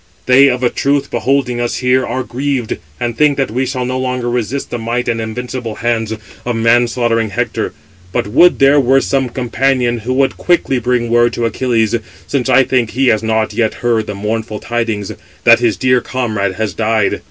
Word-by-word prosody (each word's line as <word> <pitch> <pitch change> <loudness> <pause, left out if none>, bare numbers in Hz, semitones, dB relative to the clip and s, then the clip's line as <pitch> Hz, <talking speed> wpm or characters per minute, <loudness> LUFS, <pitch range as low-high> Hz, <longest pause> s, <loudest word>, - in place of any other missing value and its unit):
They, 130 +2 +6
of 125 0 -2
a 120 - +2
truth, 140 0 0
beholding 130 -3 0
us 120 - -1
here, 125 0 +2
are 130 - -2
grieved, 130 -2 -3 0.2
and 120 -1 -2
think 150 +1 +3
that 135 -5 -1
we 130 +3 -1
shall 130 -1 -2
no 130 +1 -2
longer 125 -2 -2
resist 125 +3 -3
the 120 - -3
might 120 +2 -2
and 115 -1 -1
invincible 115 0 -5
hands 115 -2 -1 0.3
of 120 -1 -2
man 115 +2 +3
slaughtering 115 -2 0
Hector. 95 - -3 0.4
But, - - -1
would 155 +12 +4
there 140 +2 +5
were 135 0 +3
some 135 -2 0
companion 125 0 0
who 120 +4 -3
would 135 +1 +1
quickly 170 -7 +1
bring 120 -1 -1
word 120 0 +3
to 120 - -1
Achilles, 115 -1 0 0.3
since 135 -4 -2
I 135 - +5
think 125 -3 0
he 130 +2 +1
has 110 - +2
not 110 -1 0
yet 110 0 0
heard 115 -3 +1
the 105 - -4
mournful 105 +1 -3
tidings, 115 -4 -2 0.3
that - - +6
his 110 -5 +1
dear 125 +2 +2
comrade 105 -8 -2
has 110 0 -2
died. 110 -2 0
120 Hz, 195 wpm, -15 LUFS, 115-130 Hz, 0.4 s, They